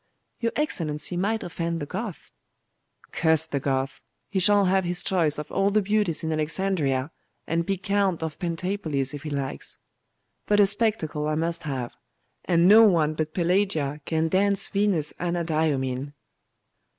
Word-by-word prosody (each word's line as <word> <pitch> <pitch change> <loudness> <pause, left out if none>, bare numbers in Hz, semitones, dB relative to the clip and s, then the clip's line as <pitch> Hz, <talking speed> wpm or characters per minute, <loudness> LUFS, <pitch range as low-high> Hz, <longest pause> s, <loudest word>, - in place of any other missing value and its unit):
'Your 230 -1 0
Excellency 165 - -2
might 210 +5 0
offend 170 -1 -3
the 145 - -4
Goth.' 210 +4 -6 0.8
'Curse 160 -1 +2
the 145 -3 -2
Goth! 135 0 -2 0.3
He 195 - +1
shall 200 +2 +4
have 190 +1 +2
his 175 0 -3
choice 165 -6 +1
of 150 0 -6
all 195 +1 +2
the 210 0 +2
beauties 205 -5 0
in 160 - -1
Alexandria, 155 -3 0 0.3
and 165 +1 -1
be 195 -1 0
count 195 -3 0
of 160 -2 -5
Pentapolis 165 -6 -2
if 145 - -6
he 155 - -6
likes. 140 -2 -3 0.7
But 205 0 +3
a 205 - +7
spectacle 195 -8 0
I 155 - 0
must 165 +1 0
have; 130 -3 -4 0.5
and 175 -1 +4
no 215 +3 +9
one 165 -8 +4
but 155 0 -3
Pelagia 170 -5 0
can 160 0 0
dance 195 +2 +2
Venus 195 -7 0
Anadyomene. 155 -6 -1
170 Hz, 150 wpm, -25 LUFS, 150-195 Hz, 0.8 s, no